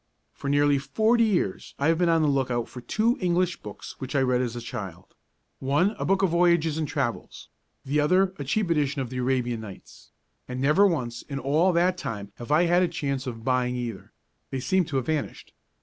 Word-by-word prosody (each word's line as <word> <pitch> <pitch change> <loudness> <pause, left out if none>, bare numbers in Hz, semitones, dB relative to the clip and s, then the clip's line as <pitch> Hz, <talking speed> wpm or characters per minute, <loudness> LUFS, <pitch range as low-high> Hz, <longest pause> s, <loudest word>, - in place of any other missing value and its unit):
For 140 - -5
nearly 145 0 +3
forty 220 - +2
years 175 - -1
I 140 +3 +1
have 165 0 +2
been 175 -1 +3
on 165 -1 +3
the - - +3
look 135 -3 +1
out 120 -1 -1
for 125 - -10
two 230 - 0
English 180 0 +1
books 105 -1 -9
which 130 +2 -5
I 140 - +3
read 125 -1 +2
as 120 -2 -3
a - - -4
child; 95 -6 -7 0.5
one 145 +9 +2
a - - -2
book 195 0 +2
of 185 - +3
voyages 170 -2 +3
and 155 - -1
travels, 135 -5 -4 0.4
the 145 +3 +1
other 185 +5 +3
a - - -3
cheap 180 +6 0
edition 145 -3 +1
of 125 - -8
the 130 - -4
Arabian 125 -2 0
Nights, 100 -4 -12 0.4
and 125 0 -5
never 150 +10 +4
once 120 -9 -2
in 140 - -6
all 150 +7 +2
that 180 +2 +2
time 100 -7 -5
have 120 +4 -7
I 155 +3 +5
had 175 +1 +3
a 180 - +3
chance 140 -5 -3
of 115 -3 -6
buying 125 -1 +1
either: 120 -6 -5 0.4
they 135 - -3
seem 185 +7 +1
to 150 - -6
have 130 -2 0
vanished. 155 0 -3
140 Hz, 215 wpm, -26 LUFS, 125-170 Hz, 0.5 s, I